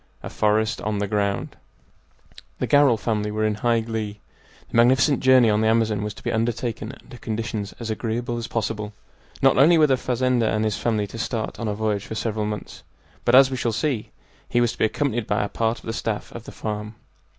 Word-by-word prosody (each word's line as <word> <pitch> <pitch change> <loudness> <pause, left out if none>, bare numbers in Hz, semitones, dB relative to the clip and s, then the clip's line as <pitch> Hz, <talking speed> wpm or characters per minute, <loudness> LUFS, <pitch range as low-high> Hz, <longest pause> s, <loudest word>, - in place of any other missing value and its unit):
A - - -6
FOREST 110 +2 +1
ON 105 -1 -2
THE 100 0 -1
GROUND 100 -1 -1 1.0
The - - -1
Garral 145 -5 +4
family 105 -2 -1
were 110 +1 -1
in 110 - +1
high 115 +2 +1
glee. 110 -2 -4 0.5
The - - -1
magnificent 130 +4 +4
journey 130 -2 +5
on 105 0 +2
the 110 - +2
Amazon 110 -2 +2
was 105 0 -4
to - - -14
be - - -1
undertaken 115 0 -2
under 125 - -12
conditions 110 -3 -4
as 115 -2 -4
agreeable 120 +2 -2
as 115 0 -4
possible. 105 -2 -3 0.5
Not - - +5
only 165 +5 +6
were 155 - +6
the 135 -3 +2
fazender 125 -2 +1
and 110 0 0
his 105 -2 0
family 110 -3 0
to 115 +3 -9
start 115 -1 -3
on 115 - -3
a 105 - -1
voyage 105 -2 -1
for 110 - -5
several 110 -1 -2
months, 105 -1 -6 0.4
but, - - +5
as 135 0 +7
we 130 - -2
shall 120 -1 0
see, 120 0 -1 0.4
he 120 - +2
was 120 -1 +2
to - - -12
be - - +4
accompanied 120 -1 -1
by 105 +1 +1
a - - -1
part 115 0 0
of - - -14
the 115 - -3
staff 110 -2 -3
of 115 -1 -9
the - - -9
farm. 105 0 -5
110 Hz, 215 wpm, -23 LUFS, 105-120 Hz, 1.0 s, as